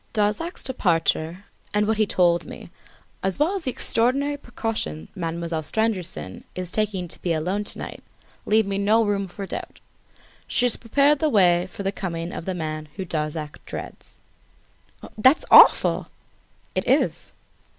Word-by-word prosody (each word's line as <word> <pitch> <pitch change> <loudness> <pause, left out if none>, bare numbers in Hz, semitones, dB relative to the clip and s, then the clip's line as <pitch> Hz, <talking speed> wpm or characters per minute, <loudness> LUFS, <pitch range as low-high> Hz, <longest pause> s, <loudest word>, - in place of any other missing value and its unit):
Darzac's 210 - -1
departure 175 -5 0 0.3
and 210 0 +3
what 220 0 0
he 215 -1 +2
told 175 -2 +2
me, - - -10 0.5
as 190 -1 -1
well 305 +7 +2
as 390 -4 -3
the - - +1
extraordinary 260 +4 +1
precautions 225 - -4
Mademoiselle 165 -1 -3
Stangerson 185 - -2
is 180 -1 -3
taking 200 -4 -1
to - - -6
be 170 - 0
alone 180 +6 -1
to - - -6
night - - -7 0.5
leaves 215 -1 +3
me 195 0 -1
no 215 +3 +3
room 200 -1 -1
for 195 +2 -7
doubt. - - -7 0.7
She 250 - +2
has 245 - +2
prepared 280 +5 +2
the 310 - +2
way 180 -6 +4
for 200 - -8
the 195 - 0
coming 170 -3 -4
of - - -6
the 190 - -2
man 155 -2 -4
whom 190 - -4
Darzac 155 -2 -4
dreads." - - -8 1.0
"That's 260 +7 +5
awful!" - - +7 0.7
"It - - -2
is!" - - +1
195 Hz, 155 wpm, -24 LUFS, 170-225 Hz, 1.0 s, awful